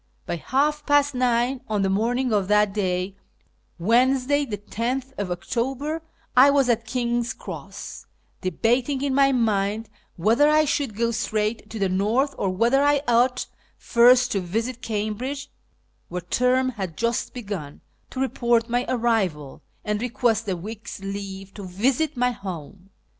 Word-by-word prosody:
By -, -, -3 dB
half 295 Hz, -, 0 dB
past 290 Hz, -1 st, +4 dB
nine 250 Hz, +1 st, +1 dB
on 210 Hz, -2 st, 0 dB
the -, -, +2 dB
morning 240 Hz, +4 st, +1 dB
of 200 Hz, -3 st, +1 dB
that 210 Hz, -1 st, +3 dB
day 185 Hz, -1 st, -1 dB, 0.6 s
(Wednesday, 255 Hz, +8 st, +2 dB
10th 235 Hz, +5 st, -3 dB, 0.2 s
October) 265 Hz, -, -2 dB, 0.3 s
I 260 Hz, +3 st, +8 dB
was 280 Hz, -3 st, +3 dB
at 230 Hz, -1 st, +1 dB
King's 240 Hz, 0 st, -1 dB
Cross, -, -, -8 dB, 0.3 s
debating 245 Hz, -, 0 dB
in 280 Hz, -2 st, 0 dB
my 275 Hz, 0 st, +4 dB
mind 215 Hz, -3 st, 0 dB, 0.3 s
whether 230 Hz, -, +4 dB
I 305 Hz, 0 st, +4 dB
should 275 Hz, -6 st, -1 dB
go 235 Hz, 0 st, +1 dB
straight 215 Hz, -1 st, -2 dB
to 225 Hz, -, -6 dB
the 200 Hz, -2 st, +1 dB
North, 215 Hz, +10 st, +1 dB
or 195 Hz, -, +1 dB
whether 235 Hz, +8 st, +2 dB
I 290 Hz, 0 st, +3 dB
ought 245 Hz, +2 st, +3 dB, 0.3 s
first 245 Hz, +1 st, +5 dB
to 200 Hz, -, +1 dB
visit 225 Hz, +7 st, -3 dB
Cambridge 230 Hz, +7 st, -3 dB, 0.6 s
(where 180 Hz, +1 st, -4 dB
term 250 Hz, +8 st, +2 dB
had 190 Hz, -9 st, -5 dB
just 235 Hz, 0 st, -1 dB
begun) 195 Hz, -11 st, -6 dB, 0.3 s
to 260 Hz, -, -7 dB
report 235 Hz, -3 st, +1 dB
my 245 Hz, +1 st, 0 dB
arrival, 215 Hz, -, 0 dB, 0.2 s
and 210 Hz, 0 st, -1 dB
request 230 Hz, -3 st, 0 dB
a 185 Hz, -, -1 dB
week's 215 Hz, +5 st, -8 dB
leave 195 Hz, -1 st, -6 dB
to 205 Hz, -, -9 dB
visit 250 Hz, -, 0 dB
my 250 Hz, 0 st, +2 dB
home. 185 Hz, -2 st, -8 dB
235 Hz, 145 wpm, -24 LUFS, 200-255 Hz, 0.6 s, I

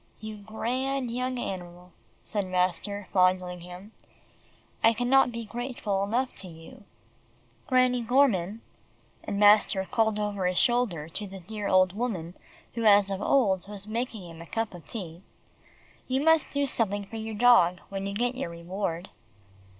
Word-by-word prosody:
"You 215 Hz, 0 st, -7 dB
grand 245 Hz, +5 st, -2 dB
young 250 Hz, +1 st, -2 dB
animal," 180 Hz, -4 st, -6 dB, 0.3 s
said 205 Hz, -3 st, -2 dB
master, 185 Hz, +2 st, -1 dB
fondling 185 Hz, -1 st, +2 dB
him. 180 Hz, +4 st, -11 dB, 0.9 s
"I 225 Hz, 0 st, +6 dB
can 245 Hz, +2 st, -2 dB
not 270 Hz, -2 st, +5 dB
be 230 Hz, -1 st, -5 dB
grateful 230 Hz, -4 st, -3 dB
enough 245 Hz, +6 st, -1 dB
to 190 Hz, -, -4 dB
you. 175 Hz, +8 st, -13 dB, 0.8 s
Granny 255 Hz, -1 st, +3 dB
Gorman," 230 Hz, -5 st, +2 dB, 0.6 s
and 200 Hz, -, -3 dB
master 205 Hz, -2 st, +5 dB
called 220 Hz, +1 st, +1 dB
over 205 Hz, -3 st, -1 dB
his 180 Hz, 0 st, -1 dB
shoulder 235 Hz, -11 st, +1 dB
to 205 Hz, +5 st, -4 dB
the 195 Hz, 0 st, -9 dB
dear 210 Hz, +3 st, -5 dB
old 185 Hz, -1 st, +4 dB
woman 195 Hz, -7 st, -3 dB, 0.4 s
who 230 Hz, -, -3 dB
as 200 Hz, -1 st, +6 dB
of 195 Hz, 0 st, -3 dB
old 195 Hz, -10 st, +2 dB
was 205 Hz, 0 st, -8 dB
making 225 Hz, -4 st, -4 dB
him 165 Hz, -1 st, -11 dB
a 170 Hz, -, -10 dB
cup 225 Hz, +1 st, -2 dB
of 170 Hz, -5 st, -12 dB
tea, 175 Hz, -6 st, -7 dB, 0.9 s
"you 265 Hz, +1 st, 0 dB
must 320 Hz, 0 st, +4 dB
do 285 Hz, 0 st, 0 dB
something 205 Hz, -6 st, 0 dB
for 225 Hz, -, -8 dB
your 220 Hz, 0 st, -5 dB
dog 205 Hz, -6 st, +5 dB
when 195 Hz, 0 st, -4 dB
you 200 Hz, -, -4 dB
get 245 Hz, +3 st, 0 dB
your 255 Hz, -8 st, -4 dB
reward." 170 Hz, +1 st, -4 dB
205 Hz, 160 wpm, -27 LUFS, 185-240 Hz, 0.9 s, I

